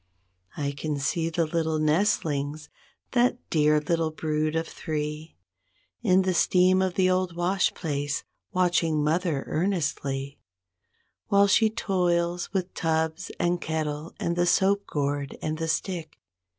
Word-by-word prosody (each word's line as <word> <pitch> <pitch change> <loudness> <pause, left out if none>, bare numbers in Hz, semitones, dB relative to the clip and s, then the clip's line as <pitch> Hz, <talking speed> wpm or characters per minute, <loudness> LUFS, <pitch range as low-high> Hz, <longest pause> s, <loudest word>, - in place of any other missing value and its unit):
29 145 - -2
I 140 - -3
can 150 -2 -1
see 165 +4 0
the 165 0 0
little 160 0 0
nestlings, 155 -3 0 0.4
that 245 -1 +3
dear 150 -1 +4
little 165 +1 0
brood 155 0 -1
of 165 0 -1
three, 150 - -5 0.6
In 190 -4 +4
the 185 0 +1
steam 185 +1 +4
of 185 -1 0
the 185 -1 +3
old 185 -1 +1
wash 180 +2 +1
place, 145 -3 -2 0.3
watching 170 -4 +2
mother 155 -2 0
earnestly 145 -6 -2 0.9
While 200 0 +5
she 220 +2 +4
toils 175 -5 0
with 185 -2 -2
"tubs 160 +1 -1
and 175 0 +1
kettle 155 0 -3
and 170 - -1
the 175 0 +2
soap 200 +3 +2
gourd 145 -1 -2
and 155 0 -3
the 165 - -1
stick''. 165 -1 -3
165 Hz, 135 wpm, -26 LUFS, 150-185 Hz, 0.9 s, While